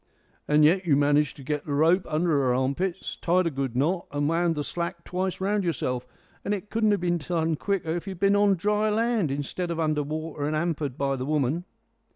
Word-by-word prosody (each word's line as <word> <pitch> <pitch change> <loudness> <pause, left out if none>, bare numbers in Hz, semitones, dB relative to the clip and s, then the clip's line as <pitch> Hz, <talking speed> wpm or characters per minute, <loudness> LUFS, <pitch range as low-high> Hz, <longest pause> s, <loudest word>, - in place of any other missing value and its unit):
"And 150 0 +5
yet 180 +3 +3
you 145 - +5
managed 145 0 +2
to 140 - -10
get 150 +2 -2
the 145 - -1
rope 165 +5 +3
under 160 +3 +1
her 135 -4 +2
armpits, 155 +9 -1
tied 180 +1 +2
a 165 - 0
good 135 -3 -3
knot, 170 +7 0
and 145 0 0
wound 165 +1 +1
the 150 - -2
slack 170 +2 -4
twice 185 +1 -3
round 200 +1 0
yourself! 125 -7 -2 0.4
And 205 - 0
it 205 +1 -9
couldn't 220 -1 +2
have 205 -3 +2
been 175 -1 +1
done 165 0 -1
quicker 170 -1 -1
if 175 - -7
you - - -3
had 175 - -14
been 200 0 +4
on 205 -1 +4
dry 210 +4 +1
land, 225 -5 +1
instead 145 +6 -3
of 170 -1 -3
under 155 -2 +1
water 155 0 -4
and 155 - -1
'ampered 155 -4 -2
by 135 -1 0
the 130 - -3
woman." 150 +3 0
165 Hz, 220 wpm, -26 LUFS, 145-185 Hz, 0.4 s, And